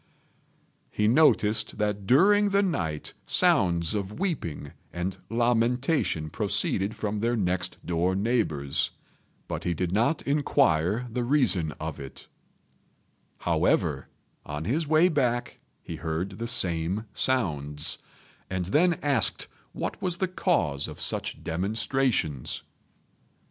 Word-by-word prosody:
He 105 - 0
noticed 115 -5 +3
that 105 -2 -2
during 205 - +5
the 200 0 +3
night 80 - -2
sounds 85 -3 +3
of 105 +4 -4
weeping 125 - -3 0.2
and 90 +2 -4
lamentation 120 - +1
proceeded 100 +3 0
from 105 -1 -3
their 120 +3 +1
next 90 -3 -1
door 90 +2 0
neighbours, 95 - 0 0.6
but - - -4
he 85 - -1
did 90 +1 -2
not 115 - +1
inquire 125 - +2
the 125 +2 -1
reason 120 - +2
of 80 -1 -6
it; 70 -1 -9 1.2
however, - - +1 0.4
on 75 +1 -5
his 150 - 0
way 155 +3 +5
back 125 -7 -1 0.2
he - - -6
heard 90 +5 -4
the 115 - -3
same 95 -3 0
sounds, 75 - +1 0.5
and 95 -1 -2
then 170 - +3
asked 140 -6 +1 0.2
what - - -5
was 180 -2 0
the 190 - 0
cause 160 - 0
of - - -9
such - - -2
demonstrations. 105 - -1
105 Hz, 115 wpm, -27 LUFS, 85-135 Hz, 1.2 s, during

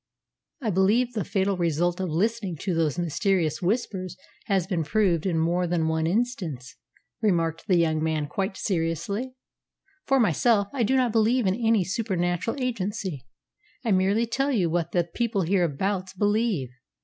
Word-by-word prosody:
"I 220 - +1
believe 215 +7 +2
the 215 -4 -1
fatal 195 0 0
result 175 +1 0
of 185 -2 -2
listening 195 +2 -1
to 190 - -1
those 165 -2 0
mysterious 170 -2 0
Whispers 185 -2 -2 0.3
has 190 -4 +1
been 175 -4 -1
proved 185 -1 +1
in 170 -3 0
more 175 +2 +1
than 165 -2 0
one 160 0 0
instance," 170 - -2 0.5
remarked 165 -6 0
the 185 - +4
young 160 -2 +2
man 155 -1 0
quite 190 +6 -3
seriously. 200 - -2 0.7
"For 270 0 +3
myself, 205 - +3
I 270 - -1
do 235 +4 +2
not 255 -3 +2
believe 225 +2 +2
in 185 - +3
any 225 -2 +2
supernatural 190 +3 -1
agency. 195 - -3 0.6
I 225 - +1
merely 195 +4 +3
tell 270 +5 0
you 185 -10 +1
what 170 -1 -1
the 175 - +2
people 205 +3 -1
hereabouts 185 +2 0
believe. 205 - 0
190 Hz, 155 wpm, -26 LUFS, 165-220 Hz, 0.7 s, the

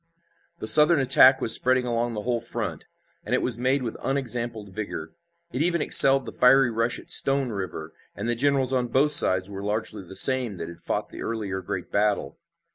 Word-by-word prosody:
The - - -9
Southern 155 +5 +5
attack 130 0 +4
was 115 - +6
spreading 130 0 +1
along 120 -1 -4
the 105 - -7
whole 120 0 -3
front, 115 -7 -7 0.4
and - - -3
it - - -2
was - - -1
made 130 +2 -2
with 115 - -7
unexampled 120 -5 -4
vigor. 80 -7 -8 0.4
It 130 - -5
even 170 +1 -1
excelled 135 -2 +5
the - - -9
fiery 125 0 +2
rush 115 +1 -3
at - - -6
Stone 135 -1 +3
River, 90 -5 -8 0.2
and 105 +4 -7
the 120 - -1
generals 135 +1 0
on 125 -2 -2
both 140 +5 0
sides 95 -10 +5
were 100 -1 -10
largely 105 0 -6
the 95 +1 -13
same 125 -1 +4
that 85 - -8
had 85 - -14
fought - - -5
the - - -12
earlier 100 -4 -6
great 90 -1 -8
battle. 100 -8 -3
120 Hz, 200 wpm, -22 LUFS, 100-130 Hz, 0.4 s, was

